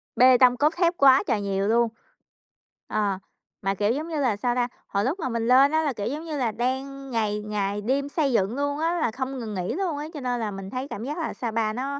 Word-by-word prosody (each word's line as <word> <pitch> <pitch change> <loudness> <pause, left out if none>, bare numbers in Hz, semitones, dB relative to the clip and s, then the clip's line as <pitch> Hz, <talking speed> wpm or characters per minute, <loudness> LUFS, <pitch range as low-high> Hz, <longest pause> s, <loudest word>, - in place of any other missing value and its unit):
bê 255 0 +7
tông, 250 -1 +5
cốt 300 +2 +3
thép 345 -1 +3
quá 270 -1 +6
trời 205 - +1
nhiều 195 0 -1
luôn. 235 +1 +3 1.0
Ờ, 200 -3 0 0.4
mà, 195 0 0
kiểu, 205 +3 +1
giống 300 +5 -2
như 315 -3 -3
là, 240 -6 +2
sao 245 +3 0
ta, 245 -1 +1 0.2
hồi 200 +1 0
lúc 325 +9 -1
mà - - -2
mình 230 -1 -1
lên 265 +3 +6
á 315 0 +2
là, 290 -3 0
kiểu, 205 -3 -4
giống 295 +6 -4
như 310 -3 -4
là, 240 -4 0
đang 265 +4 -3
ngày 210 -3 0
ngày 205 -1 -2
đêm 275 +5 0
xây 285 -4 0
dựng 210 +2 +1
luôn 285 +1 -1
á 335 +2 0
là 230 - +1
không 260 +2 -4
ngừng 220 -3 -5
nghỉ 180 -1 -2
luôn 350 -5 -1
á, 295 +1 -4
cho 295 - -6
nên 245 -2 -2
là 215 -2 -2
mình 195 0 -7
thấy 255 +4 -4
cảm 220 - -6
giác 295 +5 -4
là 325 - -3
Sa 235 -3 -4
Pa 215 -1 0
nó 275 +3 -3
250 Hz, 260 wpm, -25 LUFS, 215-280 Hz, 1.0 s, bê